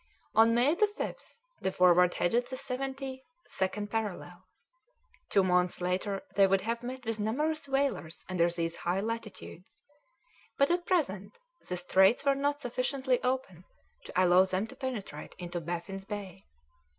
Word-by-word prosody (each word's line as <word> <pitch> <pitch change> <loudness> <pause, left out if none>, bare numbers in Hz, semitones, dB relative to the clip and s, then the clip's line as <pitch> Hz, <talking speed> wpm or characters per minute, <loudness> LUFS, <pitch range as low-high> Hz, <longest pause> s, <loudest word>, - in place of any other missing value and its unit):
On 225 +1 +5
May 255 +6 +4
5th 420 +5 -2 0.2
the 190 - 0
Forward 180 -1 +5
headed 240 +7 +1
the 260 +1 -5
seventy 265 0 -4 0.2
second 205 +2 -2
parallel; 185 -5 -4 0.8
two 195 - +4
months 180 -1 +2
later 185 +2 -1
they 195 0 +5
would 195 0 +2
have 230 +3 -2
met 255 +1 -6
with 225 -1 -2
numerous 290 +8 -1
whalers 270 - -1
under 175 -2 +2
these 170 -1 -3
high 175 +2 -1
latitudes, 215 -4 -6 0.7
but 280 +3 +4
at 350 0 0
present 205 - 0 0.3
the 180 - -1
straits 190 +8 +4
were 280 - +5
not 285 +1 -1
sufficiently 255 +1 0
open 250 -9 -2 0.4
to - - -9
allow 180 +1 +6
them 190 +2 -1
to 245 - -12
penetrate 245 - -6
into 175 -1 -5
Baffin's 175 +4 -5
Bay. 200 - -7
210 Hz, 145 wpm, -30 LUFS, 180-260 Hz, 0.8 s, allow